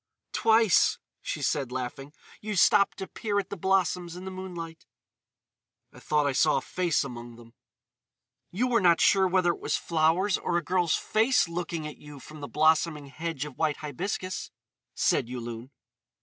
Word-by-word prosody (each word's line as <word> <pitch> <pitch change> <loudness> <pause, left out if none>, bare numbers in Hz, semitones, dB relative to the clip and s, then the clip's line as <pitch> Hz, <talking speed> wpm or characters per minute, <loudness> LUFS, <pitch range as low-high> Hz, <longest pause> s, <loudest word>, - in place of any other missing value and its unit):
"Twice," 225 -4 +4 0.2
she - - -4
said, 135 -4 0
laughing, 130 +2 -5 0.3
"you 215 0 -4
stopped 200 +2 +4
to 190 - -5
peer 210 -3 -3
at 195 -1 -2
the - - -3
blossoms 180 -2 0
in 180 +1 -8
the 190 - -5
moonlight." 175 -3 -8 1.1
"I - - -13
thought 150 -1 +1
I 140 - +2
saw 150 +3 +3
a - - -1
face 175 -4 0
among 120 -3 -8
them." 115 0 -16 1.0
"You 215 +8 -1
were 245 -2 +2
not 170 -2 +5
sure 190 -1 +4
whether 180 -1 +2
it - - -7
was - - -1
flowers 170 +4 +1
or 175 - -1
a 175 - -1
girl's 175 0 +1
face 225 0 +2
looking 170 -2 -4
at 150 - -7
you 150 -1 -11
from 150 +3 -12
the 145 - -6
blossoming 155 -1 +2
hedge 160 -1 -4
of 145 -4 -11
white 155 -2 +1
hibiscus," 185 +5 -4 0.5
said 115 - +1
Yulun. 120 0 -6
165 Hz, 170 wpm, -27 LUFS, 145-185 Hz, 1.1 s, not